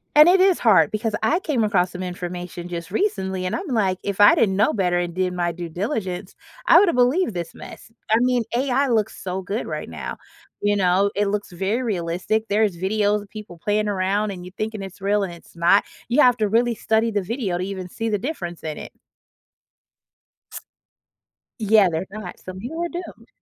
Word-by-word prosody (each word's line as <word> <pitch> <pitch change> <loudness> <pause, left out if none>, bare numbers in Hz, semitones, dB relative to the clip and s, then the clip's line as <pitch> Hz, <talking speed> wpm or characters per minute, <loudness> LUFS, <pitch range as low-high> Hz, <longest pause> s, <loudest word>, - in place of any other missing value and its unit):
and 305 +3 +9
it 375 +1 +5
is 375 -1 +4
hard 185 -10 +5
because 215 0 -1
I 335 +4 +3
came 290 -11 0
across 190 -4 +2
some 185 0 -6
information 175 -1 -6
just 170 -1 -6
recently, 190 - -1
and - - -2
I'm 375 - -4
like, 200 -7 +1
if 200 0 -1
I 205 - +8
didn't 195 -4 +2
know 210 - +4
better 180 -4 +1
and 175 -1 -2
did 185 -1 0
my 175 -1 -1
due 170 0 -7
diligence, 190 - -4 0.3
I - - +8
would 400 - +6
have - - +2
believed 250 - +2
this 170 -2 -5
mess. - - -11 0.2
I 220 - +5
mean, 250 -1 +2
AI 265 +2 +1
looks 220 -4 0
so 185 0 -3
good 200 +5 -3
right - - -5
now. - - -6 0.4
You 205 0 +2
know, 195 +1 +3
it 205 0 +1
looks 205 -2 -3
very 195 +7 -1
realistic. 195 +1 -1
There 210 +1 +1
is 200 -5 0
videos 205 +2 +1
of 200 - -18
people 210 -5 -10
playing 210 +4 0
around 200 +2 0
and 180 -2 -7
you 180 - -10
thinking 215 -2 -4
it's 195 0 -10
real 205 +1 +1
and 180 - -4
it's 170 - -16
not. 170 +4 +4 0.3
You 255 +5 +4
have 245 -1 +5
to 215 - +1
really 235 +3 +2
study 220 +2 +1
the 205 -3 -1
video 210 -4 -2
to 180 - -3
even 185 -1 -5
see 225 +5 -3
the 210 - 0
difference 185 - -5
in 155 -1 -4
it. - - -9 2.7
Yeah, 210 -2 +5
there's 160 +4 -3
not. 200 -3 -8
Some 185 0 -9
people 295 - -5
are - - -2
doomed. 350 +1 -8
205 Hz, 210 wpm, -22 LUFS, 180-225 Hz, 2.7 s, and